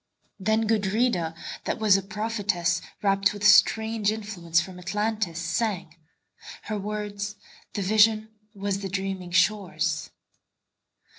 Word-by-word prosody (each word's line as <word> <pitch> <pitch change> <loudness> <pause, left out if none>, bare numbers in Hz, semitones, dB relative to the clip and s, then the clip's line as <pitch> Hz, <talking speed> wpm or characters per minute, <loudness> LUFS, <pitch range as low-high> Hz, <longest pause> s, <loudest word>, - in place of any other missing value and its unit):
Then 220 +3 +1
Gudrida, 205 -5 +1 0.3
that - - -1
was 215 -3 +5
a 195 - +2
prophetess, 205 -4 -1 0.2
Rapt 195 0 +3
with 205 0 -4
strange 220 +1 +4
influence 195 -6 -1
from 180 +1 -6
Atlantis, 210 -1 -2
sang:Her 170 +2 -5
words: 205 0 -4 0.4
the 200 - -1
vision 215 +2 +4 0.3
was 195 0 -2
the 195 -1 -4
dreaming 190 -1 -3
shore's. 190 +2 +1
200 Hz, 105 wpm, -26 LUFS, 185-215 Hz, 0.4 s, was